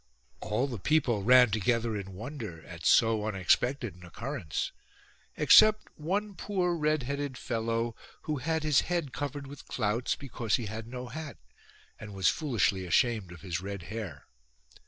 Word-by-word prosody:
All 110 +5 0
the 125 -6 -5
people 125 -4 +2
ran 125 +1 +6
together 115 +1 +1
in 95 -2 -6
wonder 110 - -7
at - - -5
so 110 -2 +4
unexpected 110 +4 +1
an 90 +1 -16
occurrence, 110 - -4 0.7
except 215 +8 +6
one 200 +7 -2
poor 180 -3 -1
red 155 -3 +1
headed 140 0 -3
fellow, 115 -1 -2 0.3
who 155 -2 -2
had 160 +3 -1
his 150 -3 +4
head 170 -7 -1
covered 145 0 -4
with 140 0 -11
clouts, 110 +4 0
because 125 -5 -2
he 120 - -2
had 110 +2 -6
no 125 +1 -6
hat, 155 0 -7 0.6
and 105 -2 -9
was 95 -3 +3
foolishly 115 -10 +1
ashamed 105 0 +2
of 90 - -11
his 90 -3 -3
red 100 -2 -6
hair. 95 - -6
120 Hz, 155 wpm, -30 LUFS, 105-145 Hz, 0.7 s, ran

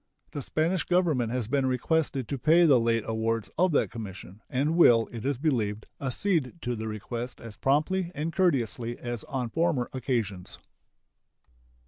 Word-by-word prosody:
The 145 - -4
Spanish 165 +6 0
Government 160 -10 +1
has 125 -3 -2
been 135 +1 +1
requested 135 0 0
to 140 - -3
pay 165 +6 +5
the 140 -6 +6
late 115 -1 +1
awards 115 0 -1
of 180 +2 +3
that - - +2
Commission, 100 -2 -8
and 145 +5 0
will, 120 -9 +6
it 115 -2 -7
is 140 -2 0
believed, 110 -8 -1 0.2
accede 140 +1 0
to 125 -1 -1
the 110 0 -5
request 115 +3 -5
as 115 -3 -10
promptly 170 +6 +1
and 155 +3 -3
courteously 120 - +1
as 120 -2 -5
on 125 -4 -3
former 165 -7 +1
occasions. 115 -8 -3
125 Hz, 155 wpm, -28 LUFS, 115-155 Hz, 0.2 s, the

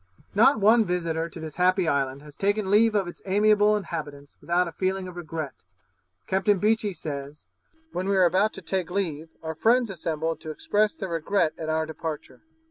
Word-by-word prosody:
Not 225 +4 +5
one 220 +3 +5
visitor 170 -3 -2
to 165 - -10
this 160 -1 -7
happy 185 0 +3
island 140 -2 0
has 150 -1 -13
taken 200 0 0
leave 215 +1 +5
of 195 -3 +1
its 175 - -9
amiable 210 +1 +4
inhabitants 145 -7 -7
without 175 +1 +1
a - - -5
feeling 190 +2 -2
of 180 - -9
regret. 160 -5 -5 0.7
Captain 195 +2 +2
Beechey 215 +1 +1
says, 145 -1 -7 0.5
'When 185 +2 -2
we 200 - +2
were 185 -1 +5
about 190 +5 +3
to 195 - -9
take 185 0 -2
leave, 165 -5 -3
our 160 0 -3
friends 230 +6 +2
assembled 160 -2 -3
to 155 - -7
express 205 +7 0
their 190 - -5
regret 165 0 +1
at 160 -1 -4
our 160 0 +1
departure. 160 -1 -6
180 Hz, 185 wpm, -26 LUFS, 160-205 Hz, 0.7 s, Not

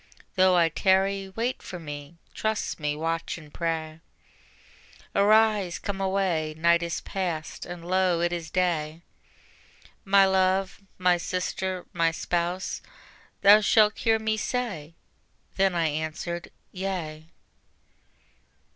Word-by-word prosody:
Though 185 -1 +5
I 170 -2 +4
tarry, 195 +3 +1
wait 230 +6 -2
for 180 - -7
Me, 150 0 -8 0.2
trust 220 -4 -2
Me, 150 -1 -1
watch 165 +2 -2
and 150 -3 -14
pray. 160 -2 -3 1.1
Arise, 210 -3 +3
come 195 -1 -4
away, 185 -5 0
night 170 +1 +4
is 170 -1 -3
past, 175 -5 -4
and 175 -1 -8
lo 185 -1 +2
it 175 +1 0
is 165 -2 -4
day, 165 -2 -1 1.0
My 195 0 +5
love, 190 0 +1 0.2
My 180 -1 +3
sister, 185 +1 -3
My 165 -1 +2
spouse, 175 +2 -2 0.6
thou 205 +2 +8
shalt 215 0 +4
hear 225 -1 +3
Me 220 0 -1
say. 205 -10 -3 0.6
Then 190 -2 +3
I 170 -1 +1
answered: 160 +3 -4 0.2
Yea. 175 -5 -4
180 Hz, 120 wpm, -26 LUFS, 165-195 Hz, 1.1 s, thou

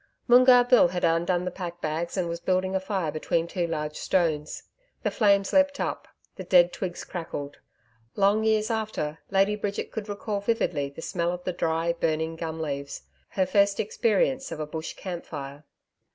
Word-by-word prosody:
Moongarr 250 0 +7
Bill 250 -7 +6
had 180 0 -4
undone 175 +2 +2
the 180 - -2
pack 175 -2 -6
bags 165 +4 -3
and 180 -2 0
was 170 0 -4
building 185 +1 0
a - - +2
fire 190 -4 -2
between 160 +2 -1
two 175 0 -2
large 150 -2 -3
stones. 155 -5 -1 0.4
The - - 0
flames 200 -3 +2
leaped 285 0 +3
up, - - -3 0.3
the 190 - -5
dead 175 -1 +5
twigs 180 -2 -4
crackled. 160 -5 -6 0.6
Long 205 +2 +3
years 220 0 +2
after, 210 -9 -3
Lady 195 +1 +3
Bridget 205 -1 -4
could 215 -1 -6
recall 205 0 -3
vividly 200 -9 0
the 150 +4 -10
smell 170 -2 -1
of 180 0 -6
the 185 - -2
dry 165 0 0
burning 160 -1 -1
gum 160 -1 -5
leaves 140 -2 -4 0.3
her 190 - +1
first 200 +1 +2
experience 230 +5 +1
of - - -5
a 155 - -2
bush 160 +1 -6
campfire. 150 -6 -7
180 Hz, 175 wpm, -26 LUFS, 160-200 Hz, 0.6 s, Moongarr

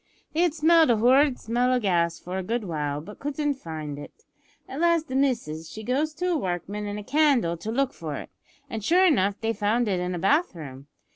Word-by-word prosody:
They 320 - +1
had 345 -3 +2
smelled 325 0 +5
a 235 - +4
horrid 260 +4 +4
smell 245 +3 0
o' 255 - +3
gas 170 -5 +1
for 185 +2 -5
a - - -4
good 230 +4 -2
while, 150 -5 -3
but 205 +7 -12
couldn't 290 +1 -1
find 155 - -7
it. 450 - -12 0.4
At 270 - -6
last 335 -2 +2
the 260 - -3
missis, 230 - -1
she 220 - -8
goes 290 +7 -1
with 360 - -6
a - - +1
workman 195 - -3
an 205 0 -4
a 210 - -6
candle 265 - +2
to 210 +7 -5
look 270 +2 0
for 155 -3 -6
it, - - -8 0.4
an' 225 -5 -5
sure 355 - +4
enough 200 - +2
they 225 0 0
found 220 +3 +1
it 190 -3 0
in 180 0 -2
a - - -3
bathroom. 165 - -1
225 Hz, 220 wpm, -25 LUFS, 180-285 Hz, 0.4 s, smelled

